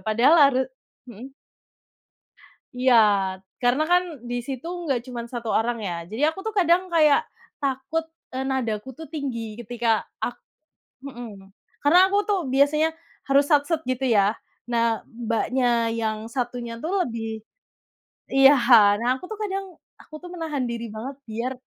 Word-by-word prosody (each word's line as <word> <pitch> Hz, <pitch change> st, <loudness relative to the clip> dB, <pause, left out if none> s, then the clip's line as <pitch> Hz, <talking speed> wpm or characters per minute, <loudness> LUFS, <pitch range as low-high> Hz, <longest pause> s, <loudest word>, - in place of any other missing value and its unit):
Padahal 235 Hz, +8 st, +4 dB
harus 260 Hz, -1 st, 0 dB, 0.5 s
mhm. 260 Hz, +6 st, -11 dB, 1.4 s
Iya, 255 Hz, 0 st, +3 dB, 0.7 s
karena 255 Hz, +5 st, +3 dB
kan 360 Hz, 0 st, +5 dB, 0.3 s
di 245 Hz, -, -2 dB
situ 270 Hz, +4 st, -6 dB, 0.2 s
enggak 270 Hz, -6 st, 0 dB
cuman 240 Hz, -2 st, -5 dB
1 235 Hz, -2 st, -5 dB
orang 235 Hz, +1 st, 0 dB
ya. 195 Hz, -5 st, -3 dB
Jadi, 220 Hz, -, -7 dB
aku 320 Hz, +4 st, -2 dB
tuh 440 Hz, -, -3 dB
kadang 355 Hz, +1 st, +2 dB
kayak 305 Hz, -4 st, +4 dB, 0.4 s
takut, 270 Hz, +4 st, -1 dB, 0.3 s
eee, 265 Hz, -, -1 dB
nadaku 260 Hz, -4 st, -2 dB
tuh 320 Hz, +5 st, -10 dB
tinggi 250 Hz, -8 st, -5 dB
ketika 230 Hz, -1 st, 0 dB, 0.2 s
ak 240 Hz, -, -3 dB, 0.7 s
mhm. 210 Hz, -7 st, -10 dB, 0.3 s
Karena, 300 Hz, +5 st, +5 dB
aku 405 Hz, -, +2 dB
tuh 410 Hz, -2 st, +1 dB
biasanya 290 Hz, +4 st, +3 dB, 0.4 s
harus 280 Hz, +1 st, +4 dB
sat-set 300 Hz, +2 st, +2 dB
gitu 255 Hz, +1 st, -1 dB
ya. 205 Hz, 0 st, +3 dB, 0.3 s
Nah, 230 Hz, -1 st, +1 dB
Mbaknya 235 Hz, 0 st, 0 dB
yang 220 Hz, -1 st, -2 dB
satunya 240 Hz, -1 st, -4 dB
tuh 325 Hz, -, -3 dB, 0.2 s
lebih 225 Hz, -2 st, -5 dB, 0.9 s
iya. 270 Hz, +1 st, +6 dB, 0.4 s
Nah, 235 Hz, -, -1 dB
aku 260 Hz, -, -12 dB
tuh 435 Hz, -, -6 dB
kadang 390 Hz, -2 st, -3 dB, 0.4 s
aku -, -, -17 dB
tuh 355 Hz, -, -9 dB
menahan 315 Hz, -5 st, -3 dB
diri 235 Hz, 0 st, -4 dB
banget 255 Hz, +6 st, -6 dB
biar 235 Hz, +4 st, -3 dB
255 Hz, 140 wpm, -24 LUFS, 230-290 Hz, 1.4 s, iya